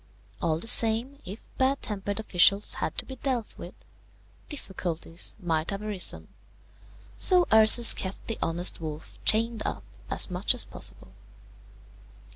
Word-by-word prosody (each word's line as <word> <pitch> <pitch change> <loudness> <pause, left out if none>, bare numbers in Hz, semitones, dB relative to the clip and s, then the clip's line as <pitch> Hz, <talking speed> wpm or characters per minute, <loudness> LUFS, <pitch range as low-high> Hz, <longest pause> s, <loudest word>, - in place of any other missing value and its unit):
All 160 -2 -2
the 165 - -8
same, 230 +5 +3
if 200 +5 -10
bad 265 +1 -1
tempered 205 0 -6
officials 200 +1 +2
had - - -5
to - - -1
be 265 - -11
dealt 250 -5 -5
with, - - -11 0.7
difficulties 180 - -5
might 165 -4 -4
have 200 +1 -6
arisen; 210 -4 +1 0.9
so 360 -2 +3
Ursus 220 +2 +8
kept 190 0 -8
the 225 - -7
honest 170 +1 0
wolf 155 -1 -10
chained 225 0 +2
up - - -6 0.3
as - - +1
much 180 +7 0
as 250 - -2
possible. - - -6
210 Hz, 135 wpm, -25 LUFS, 175-230 Hz, 0.9 s, Ursus